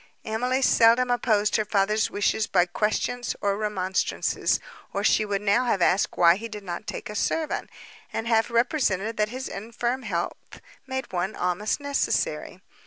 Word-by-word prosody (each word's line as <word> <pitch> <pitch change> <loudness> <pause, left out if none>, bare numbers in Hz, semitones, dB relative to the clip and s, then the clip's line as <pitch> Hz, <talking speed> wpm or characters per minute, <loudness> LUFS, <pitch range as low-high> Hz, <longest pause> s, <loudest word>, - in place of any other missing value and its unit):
Emily 250 +4 0
seldom 240 +1 +5
opposed 215 -4 +2
her 215 - +1
father's 210 +1 +1
wishes 205 +1 0
by 175 -2 +3
questions 215 +6 -1
or 200 -1 0
remonstrances, 190 -3 0 0.3
or 200 - -1
she 215 - +3
would 205 -1 -2
now 210 +5 +3
have 220 -5 +1
asked 185 +3 +2
why 170 +1 +6
he 230 +3 -6
did 210 -2 -8
not 180 +2 -6
take - - -5
a 210 - -7
servant, 310 +8 -1 0.4
and 225 - -3
have 225 0 +2
represented 230 - +1
that 210 0 +1
his 260 +3 -5
infirm 235 +5 -3
health 180 -8 -4 0.3
made 265 -3 -4
one 185 +4 -1
almost 180 +7 -1
necessary. 285 -1 -1
215 Hz, 160 wpm, -25 LUFS, 200-240 Hz, 0.4 s, why